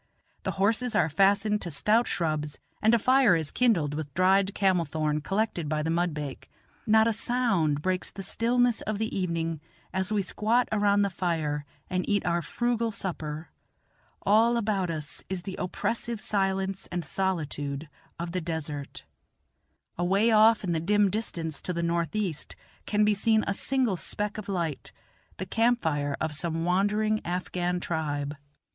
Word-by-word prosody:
The -, -, -2 dB
horses 225 Hz, +4 st, +1 dB
are 165 Hz, -5 st, +3 dB
fastened 200 Hz, +5 st, +3 dB
to 175 Hz, -, -4 dB
stout 210 Hz, +11 st, +2 dB
shrubs, 155 Hz, -3 st, -1 dB, 0.2 s
and 220 Hz, +2 st, +5 dB
a -, -, +5 dB
fire 255 Hz, -3 st, +5 dB
is 160 Hz, -3 st, -2 dB
kindled 185 Hz, -, +2 dB
with 150 Hz, -1 st, -4 dB
dried 190 Hz, +2 st, +3 dB
camel 190 Hz, -3 st, +3 dB
thorn 155 Hz, 0 st, -1 dB
collected 190 Hz, -3 st, -1 dB
by 150 Hz, 0 st, 0 dB
the 160 Hz, -, 0 dB
mudbake. 155 Hz, -5 st, -2 dB, 0.4 s
Not 220 Hz, 0 st, +5 dB
a 230 Hz, -, +2 dB
sound 195 Hz, -, +1 dB
breaks 185 Hz, -1 st, -1 dB
the 195 Hz, -, -8 dB
stillness 240 Hz, +4 st, +1 dB
of 215 Hz, -1 st, -2 dB
the 220 Hz, +1 st, -2 dB
evening 165 Hz, -4 st, -2 dB, 0.3 s
as 190 Hz, +2 st, -1 dB
we 210 Hz, -2 st, +1 dB
squat 225 Hz, +6 st, +1 dB
around 205 Hz, -1 st, +3 dB
the 200 Hz, -, 0 dB
fire 155 Hz, -5 st, -1 dB, 0.2 s
and 185 Hz, 0 st, -2 dB
eat 205 Hz, -2 st, +1 dB
our 170 Hz, 0 st, +1 dB
frugal 235 Hz, +4 st, -1 dB
supper 160 Hz, -5 st, -4 dB, 0.7 s
all 230 Hz, +3 st, +4 dB
about 200 Hz, -5 st, 0 dB
us 150 Hz, -3 st, -4 dB
is 185 Hz, -2 st, -3 dB
the 190 Hz, +1 st, -5 dB
oppressive 230 Hz, +5 st, -2 dB
silence 195 Hz, -2 st, -1 dB
and 175 Hz, -2 st, -3 dB
solitude 150 Hz, -5 st, -2 dB, 0.3 s
of 170 Hz, 0 st, -4 dB
the 180 Hz, +1 st, -2 dB
desert 155 Hz, -4 st, -5 dB, 1.0 s
Away 195 Hz, +6 st, +3 dB
off 220 Hz, 0 st, +5 dB
in 180 Hz, -, -1 dB
the 165 Hz, -, +1 dB
dim 205 Hz, +3 st, +3 dB
distance 170 Hz, -8 st, -3 dB
to 180 Hz, -, -3 dB
the 170 Hz, 0 st, -2 dB
northeast 170 Hz, 0 st, -2 dB, 0.3 s
can 210 Hz, 0 st, +3 dB
be 210 Hz, -, +4 dB
seen 220 Hz, +2 st, +2 dB
a 200 Hz, -, 0 dB
single 250 Hz, -3 st, +1 dB
speck 210 Hz, +4 st, -3 dB
of 205 Hz, -, -8 dB
light 170 Hz, -6 st, -3 dB, 0.5 s
the 185 Hz, -, -4 dB
camp 235 Hz, +5 st, +2 dB
fire 145 Hz, -3 st, -1 dB
of 155 Hz, -1 st, -2 dB
some 165 Hz, +1 st, -2 dB
wandering 210 Hz, +4 st, +1 dB
Afghan 180 Hz, 0 st, -2 dB
tribe. 150 Hz, -4 st, -2 dB
185 Hz, 160 wpm, -28 LUFS, 160-215 Hz, 1.0 s, and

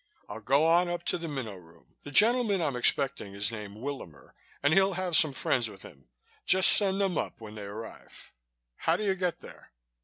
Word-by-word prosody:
"I'll 105 Hz, +2 st, -8 dB
go 135 Hz, +7 st, +2 dB
on 175 Hz, +2 st, +3 dB
up 175 Hz, 0 st, -4 dB
to -, -, -1 dB
the 165 Hz, -, -5 dB
Minnow 130 Hz, -9 st, -5 dB
Room. 85 Hz, -1 st, -20 dB
The -, -, -10 dB
gentleman 220 Hz, -, +3 dB
I'm 150 Hz, -6 st, -1 dB
expecting 125 Hz, -5 st, 0 dB
is 100 Hz, +3 st, +1 dB
named 105 Hz, -2 st, -8 dB
Willamer 130 Hz, -, -8 dB, 0.3 s
and 145 Hz, +2 st, +3 dB
he'll 195 Hz, +2 st, +4 dB
have 180 Hz, -2 st, -1 dB
some 155 Hz, -2 st, +6 dB
friends 125 Hz, -3 st, -1 dB
with 100 Hz, -2 st, -13 dB
him. 70 Hz, -6 st, -15 dB, 0.3 s
Just 190 Hz, 0 st, +4 dB
send 195 Hz, -1 st, +3 dB
them 195 Hz, -4 st, 0 dB
up -, -, -5 dB
when 110 Hz, -2 st, -10 dB
they 105 Hz, -, -9 dB
arrive. 110 Hz, +3 st, -10 dB, 0.5 s
How 165 Hz, -, +1 dB
do 215 Hz, -, -3 dB
you 200 Hz, -2 st, +2 dB
get 180 Hz, -2 st, -3 dB
there?" -, -, -14 dB
145 Hz, 205 wpm, -28 LUFS, -, 0.5 s, some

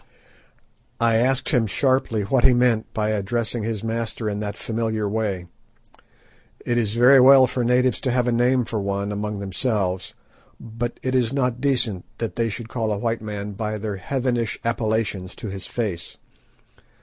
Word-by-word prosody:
I 115 Hz, -1 st, +3 dB
asked 130 Hz, +3 st, +1 dB
him 120 Hz, -5 st, +2 dB
sharply 130 Hz, -2 st, +1 dB
what 120 Hz, +5 st, +1 dB
he 125 Hz, -, +6 dB
meant 120 Hz, -3 st, +2 dB
by 110 Hz, -1 st, -1 dB
addressing 110 Hz, +2 st, -1 dB
his 110 Hz, -1 st, -3 dB
master 115 Hz, 0 st, -3 dB
in 105 Hz, -1 st, -2 dB
that 105 Hz, 0 st, -4 dB
familiar 110 Hz, -2 st, -2 dB
way. 100 Hz, -4 st, -2 dB, 1.2 s
It 120 Hz, 0 st, +1 dB
is 110 Hz, -2 st, -1 dB
very 125 Hz, +3 st, +7 dB
well 130 Hz, +1 st, +8 dB
for 125 Hz, 0 st, -2 dB
natives 125 Hz, 0 st, +2 dB
to 130 Hz, -, -1 dB
have 125 Hz, 0 st, +2 dB
a 125 Hz, -, +1 dB
name 125 Hz, +1 st, +2 dB
for 110 Hz, -2 st, -3 dB
one 100 Hz, +1 st, -2 dB
among 105 Hz, 0 st, -3 dB
themselves, 95 Hz, -2 st, -2 dB, 0.4 s
but 115 Hz, +1 st, -5 dB
it 130 Hz, -, -1 dB
is 125 Hz, -3 st, +2 dB
not 125 Hz, -3 st, 0 dB
decent 125 Hz, -9 st, 0 dB
that 110 Hz, -6 st, -4 dB
they 115 Hz, -1 st, 0 dB
should 110 Hz, +2 st, -6 dB
call 110 Hz, -2 st, -2 dB
a 105 Hz, -, 0 dB
white 115 Hz, +1 st, -1 dB
man 105 Hz, -1 st, -5 dB
by 110 Hz, +1 st, -3 dB
their 105 Hz, -1 st, -4 dB
heathenish 120 Hz, +1 st, -1 dB
appellations 110 Hz, -5 st, -1 dB
to 110 Hz, -, -6 dB
his 95 Hz, -1 st, -6 dB
face. 100 Hz, -8 st, -4 dB
115 Hz, 170 wpm, -23 LUFS, 105-120 Hz, 1.2 s, well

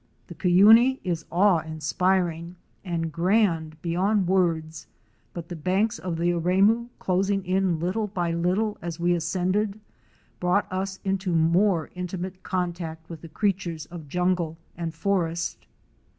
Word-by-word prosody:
The -, -, -7 dB
Cuyuni 210 Hz, -, +5 dB
is 170 Hz, -3 st, -2 dB
awe 185 Hz, 0 st, +4 dB
inspiring 170 Hz, +2 st, -1 dB, 0.3 s
and 165 Hz, -3 st, -2 dB
grand 170 Hz, -3 st, +1 dB
beyond 185 Hz, +3 st, +1 dB
words, 165 Hz, -4 st, 0 dB, 0.4 s
but 170 Hz, -2 st, -7 dB
the 175 Hz, -, -6 dB
banks 195 Hz, +8 st, 0 dB
of 175 Hz, -3 st, -4 dB
the 170 Hz, +1 st, +1 dB
Aremu, 195 Hz, +7 st, +2 dB
closing 195 Hz, +1 st, 0 dB
in 185 Hz, -2 st, +1 dB
little 185 Hz, +6 st, -1 dB
by 175 Hz, -4 st, -2 dB
little 185 Hz, +6 st, 0 dB
as 170 Hz, 0 st, -5 dB
we 175 Hz, +1 st, +2 dB
ascended, 185 Hz, +5 st, -1 dB, 0.6 s
brought 180 Hz, +3 st, +2 dB
us 190 Hz, +1 st, -3 dB
into 190 Hz, -2 st, -1 dB
more 170 Hz, +1 st, +2 dB
intimate 180 Hz, +1 st, -5 dB
contact 170 Hz, -3 st, -4 dB
with 160 Hz, -2 st, -8 dB
the 165 Hz, -, -10 dB
creatures 175 Hz, -3 st, -2 dB
of 165 Hz, -4 st, -9 dB
jungle 180 Hz, -1 st, 0 dB, 0.2 s
and 165 Hz, -1 st, -5 dB
forest. 170 Hz, -2 st, -2 dB
180 Hz, 135 wpm, -25 LUFS, 165-195 Hz, 0.6 s, Cuyuni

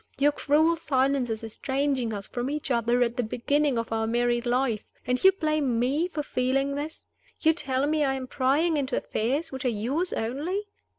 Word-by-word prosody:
Your 290 Hz, +1 st, +4 dB
cruel 310 Hz, +3 st, +2 dB
silence 270 Hz, -4 st, +1 dB
is 220 Hz, 0 st, -3 dB
estranging 265 Hz, +2 st, -1 dB
us 200 Hz, -1 st, -5 dB
from 245 Hz, +2 st, -3 dB
each 295 Hz, -1 st, -3 dB
other 240 Hz, +1 st, +2 dB
at 235 Hz, +1 st, -2 dB
the -, -, +2 dB
beginning 270 Hz, +4 st, 0 dB
of 230 Hz, 0 st, -3 dB
our 225 Hz, 0 st, 0 dB
married 240 Hz, +1 st, +1 dB
life. 245 Hz, -3 st, +1 dB, 0.2 s
And 250 Hz, +1 st, 0 dB
you 380 Hz, -, +9 dB
blame 305 Hz, -9 st, 0 dB
me 275 Hz, +8 st, +1 dB
for 315 Hz, -4 st, -4 dB
feeling 270 Hz, +2 st, 0 dB
this? 295 Hz, +3 st, -5 dB, 0.3 s
You 320 Hz, 0 st, +4 dB
tell 270 Hz, -4 st, -1 dB
me 305 Hz, 0 st, +1 dB
I 270 Hz, -1 st, +1 dB
am 260 Hz, -1 st, -4 dB
prying 290 Hz, +6 st, +1 dB
into 280 Hz, -1 st, -1 dB
affairs 280 Hz, +9 st, -1 dB
which 265 Hz, 0 st, -5 dB
are -, -, +1 dB
yours 260 Hz, -, -1 dB
only? 295 Hz, -, -2 dB
265 Hz, 190 wpm, -27 LUFS, 240-295 Hz, 0.3 s, you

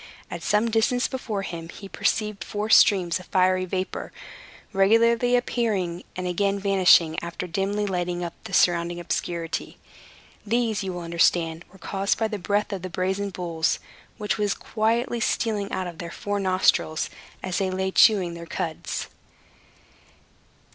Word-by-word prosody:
At -, -, -5 dB
some 215 Hz, +2 st, +1 dB
distance 245 Hz, +3 st, +2 dB
before 220 Hz, -6 st, -4 dB
him 165 Hz, -3 st, -6 dB
he 195 Hz, -, -9 dB
perceived 210 Hz, -1 st, -1 dB
four 210 Hz, +3 st, -3 dB
streams 185 Hz, -6 st, +5 dB
of 185 Hz, -, -13 dB
fiery 185 Hz, 0 st, +2 dB
vapor, 185 Hz, +1 st, -4 dB, 0.6 s
regularly 230 Hz, +5 st, +4 dB
appearing 205 Hz, -8 st, -1 dB
and 185 Hz, -, -4 dB
again 195 Hz, +3 st, 0 dB
vanishing, 185 Hz, -5 st, +4 dB
after 170 Hz, +1 st, -5 dB
dimly 195 Hz, +4 st, -1 dB
lighting 180 Hz, -2 st, -2 dB
up 170 Hz, -, -4 dB
the -, -, -7 dB
surrounding 175 Hz, -1 st, +2 dB
obscurity. 170 Hz, -1 st, -3 dB, 0.7 s
These, 225 Hz, -1 st, 0 dB
you 190 Hz, -, -3 dB
will 175 Hz, -, -5 dB
understand, 170 Hz, 0 st, +1 dB
were 190 Hz, -, -16 dB
caused 195 Hz, +1 st, -1 dB
by 225 Hz, -, +1 dB
the 210 Hz, -2 st, -4 dB
breath 205 Hz, +3 st, 0 dB
of 190 Hz, -, -4 dB
the 185 Hz, -, -5 dB
brazen 190 Hz, +3 st, -1 dB
bulls, 170 Hz, -4 st, -1 dB, 0.4 s
which 210 Hz, -1 st, -2 dB
was 205 Hz, -1 st, +1 dB
quietly 230 Hz, +2 st, 0 dB
stealing 210 Hz, -2 st, -1 dB
out 185 Hz, -1 st, -2 dB
of 175 Hz, -2 st, -8 dB
their 170 Hz, -, -5 dB
four 205 Hz, +3 st, -3 dB
nostrils, 185 Hz, -4 st, +2 dB, 0.3 s
as 185 Hz, -1 st, -1 dB
they 190 Hz, -1 st, 0 dB
lay 190 Hz, +1 st, -1 dB
chewing 190 Hz, -4 st, +5 dB
their 170 Hz, 0 st, -8 dB
cuds. 160 Hz, -2 st, -4 dB
190 Hz, 150 wpm, -25 LUFS, 175-210 Hz, 0.7 s, streams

